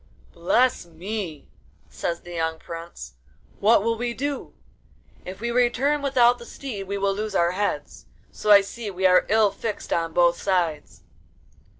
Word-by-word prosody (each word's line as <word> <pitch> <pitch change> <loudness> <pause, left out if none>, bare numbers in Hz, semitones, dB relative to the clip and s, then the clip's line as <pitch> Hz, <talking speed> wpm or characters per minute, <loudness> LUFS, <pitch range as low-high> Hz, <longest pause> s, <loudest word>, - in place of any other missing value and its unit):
'Bless 195 +5 +1
me,' 170 -1 -6 0.4
says 170 0 -4
the 175 - -10
young 160 -1 -1
prince, 165 - -9 0.5
'what 210 0 +4
will 230 +1 +1
we 240 -1 -2
do? 285 +1 -4 0.7
If 185 +2 -8
we 235 +2 -2
return 250 +4 +2
without 245 -3 +3
the 235 - -10
steed 210 -9 -7
we 200 +1 -2
will 200 0 +1
lose 210 0 -4
our 170 -1 +3
heads, 200 +3 -3 0.2
so 210 - -4
I 205 -1 +9
see 210 +2 -7
we 190 -1 -3
are 180 0 +5
ill 215 -1 +4
fixed 210 +1 -4
on 165 -1 -1
both 170 0 +3
sides. 175 -6 -1
200 Hz, 160 wpm, -24 LUFS, 175-235 Hz, 0.7 s, I